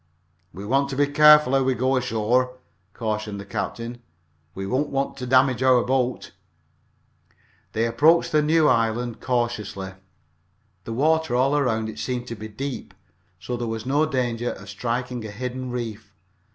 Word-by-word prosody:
"We 100 +1 -8
want 135 +5 +1
to 135 - -4
be 145 +1 +3
careful 150 -1 +6
how 135 - +4
we 130 -1 +1
go 130 +2 +1
ashore," 125 +1 0 0.3
cautioned 110 -2 -3
the 100 - -8
captain. 115 +4 -5 0.5
"We 95 - -4
don't 130 +8 0
want 135 0 -2
to 125 - -5
damage 130 -1 +3
our 130 -2 +5
boat." 130 -1 -1 1.4
They 115 +1 +1
approached 150 +9 +3
the 155 - +4
new 155 +1 +3
land 115 -2 +1
cautiously. 115 -6 -2 0.9
The 115 - -4
water 155 +1 +1
all 135 +3 +2
around 115 -6 +1
it 110 - -7
seemed 125 -1 -3
to 115 - -4
be 110 0 -8
deep, 130 +5 -6 0.4
so 125 - -4
there 120 -1 -3
was 115 0 -4
no 145 +4 +2
danger 120 -4 -1
of - - -12
striking 120 0 -3
a 110 - -6
hidden 125 +4 -5
reef. 115 -4 -5
125 Hz, 160 wpm, -24 LUFS, 115-135 Hz, 1.4 s, careful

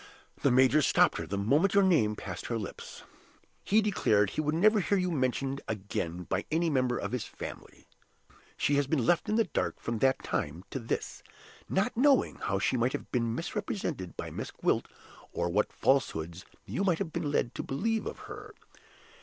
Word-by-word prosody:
The 140 - +4
major 130 +4 +5
stopped - - +3
her - - -5
the 100 - -3
moment 145 - +2
your 200 - +6
name 135 - +3
passed - - -6
her 115 - -1
lips: 105 - -8 0.6
he 215 +2 +3
declared 105 - +2
he - - -1
would 150 0 0
never 215 +5 +5
hear 200 +1 +1
you 180 -1 0
mentioned 135 -1 -1
again 95 -4 -3
by 95 +2 -2
any 165 +1 +1
member 130 -3 +1
of - - -4
his 125 -2 -2
family. - - -9 0.7
She 145 - +2
has 140 -1 +1
been 140 -5 +1
left 175 - +2
in 215 - +2
the 225 - +4
dark - - -2
from 115 -1 -3
that 135 +2 +2
time 80 +5 -3
to - - -3
this, 115 - -4 0.5
not 200 +6 0
knowing 270 +2 +3
how 95 - -1
she 105 +6 +1
might 125 +2 +1
have - - -5
been 115 -2 0
misrepresented 170 - -4
by - - -5
Miss - - -5
Gwilt, - - 0 0.5
or 85 - -1
what 105 +4 +1
falsehoods 85 - 0 0.2
you 195 - -2
might 180 -4 +2
have 165 -4 -4
been 165 -3 -2
led 120 -4 0
to - - -4
believe 220 +11 -1
of - - -7
her. 425 0 -9
140 Hz, 190 wpm, -30 LUFS, 115-190 Hz, 0.7 s, your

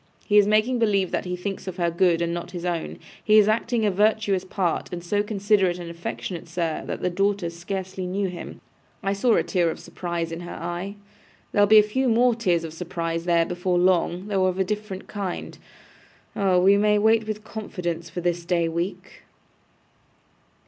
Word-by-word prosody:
He 210 -1 +5
is 205 - +4
making 215 +4 +2
believe 200 -5 +2
that - - -1
he 180 0 -2
thinks 195 +2 -5
of 185 0 -5
her 170 -1 +1
good 170 -1 +2
and 170 0 -1
not 175 0 -5
his 175 -1 -5
own. 170 -2 -3 0.3
He 215 0 +5
is 210 -1 +6
acting 230 +1 +1
a 205 - +3
virtuous 205 -1 +2
part, 185 -2 -2
and 175 -1 -5
so 205 +4 +1
considerate 200 -3 +1
and 170 -1 -7
affectionate, 170 +1 -6
sir, 165 -2 -2
that - - -4
the - - +1
daughter 195 -1 0
scarcely 185 +2 -5
knew 195 +2 -1
him. 180 -1 -8 0.4
I 195 0 +1
saw 220 +4 +3
a - - +2
tear 175 -3 +1
of - - -5
surprise 170 -2 -4
in 165 - -5
her 175 0 -7
eye. 175 +4 -5 0.6
There'll 205 -1 +4
be 215 +1 +7
a 210 - +8
few 255 +5 0
more 240 +2 +4
tears 180 -8 +1
of 160 -1 -6
surprise 165 -1 -3
there 170 -1 +3
before 180 +1 -1
long, 180 0 +2
though 195 -3 +1
of 185 0 -1
a 190 - +2
different 205 -1 -4
kind. 195 -4 -5 0.8
Oh! 190 -2 +3
we 195 +2 +5
may 210 0 +3
wait 220 +1 +3
with 215 0 -4
confidence 180 -6 -5
for 175 +2 -5
this 175 0 -1
day 170 -1 +1
week. 170 +3 -4
185 Hz, 195 wpm, -24 LUFS, 175-210 Hz, 0.8 s, a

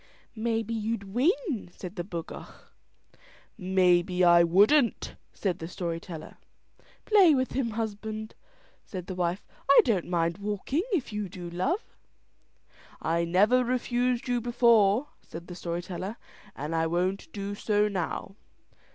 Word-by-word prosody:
"Maybe 225 0 -1
you'd 225 -1 -2
win," 275 - 0
said 180 +2 -9
the 175 - -3
bocough. 170 -3 -7 1.1
"Maybe 180 -1 +2
I 175 -1 +7
wouldn't," 210 - +3 0.2
said 185 -5 -2
the 160 - -5
story 170 -1 -4
teller. 165 -2 -9 0.7
"Play 385 -8 +6
with 260 -1 0
him, 260 -3 -1
husband," 220 0 -4 0.5
said 185 -2 -7
his 185 - -5
wife. 180 +2 -1 0.2
"I 280 - +8
don't 205 -8 +1
mind 170 0 0
walking, 210 - -1
if 295 - -1
you 210 -2 -3
do, 175 -2 -8
love." 185 - -2 1.0
"I 170 +1 0
never 210 +9 +4
refused 245 0 0
you 245 -1 0
before," 235 0 +3
said 170 +1 -10
the 180 - -9
story 175 0 -4
teller, 185 +4 -5 0.4
"and 150 +3 -4
I 165 0 +1
won't 185 - -1
do 200 0 -4
so 210 0 +1
now." 195 0 -4
200 Hz, 135 wpm, -28 LUFS, 175-235 Hz, 1.1 s, I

